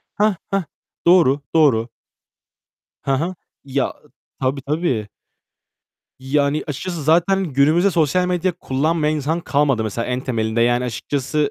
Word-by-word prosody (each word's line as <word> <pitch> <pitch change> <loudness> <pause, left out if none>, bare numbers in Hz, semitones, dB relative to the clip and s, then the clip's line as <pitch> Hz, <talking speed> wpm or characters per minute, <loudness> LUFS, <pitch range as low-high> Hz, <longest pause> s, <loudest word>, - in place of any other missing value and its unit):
Hah! 210 -1 +2
Hah! 195 -3 0 0.4
Doğru. 165 -6 +5
Doğru. 130 -8 +4 1.1
Hı 135 - 0
hı. 165 +7 -1 0.3
Ya 135 -1 -1 0.5
Tabii, 135 +1 -1
tabii. 140 -8 -1 1.1
Yani, 140 +2 0
açıkçası 165 +3 -4
zaten 175 +6 +3
günümüzde 155 +6 +3
sosyal 170 +2 +2
medya 180 0 0
kullanmayan 155 0 0
insan 155 +4 -1
kalmadı 140 -6 +1
mesela 110 +2 -3
en 125 0 -1
temelinde. 115 -3 -1
Yani, 120 +1 +2
açıkçası 140 +5 -1
145 Hz, 120 wpm, -20 LUFS, 130-170 Hz, 1.1 s, Doğru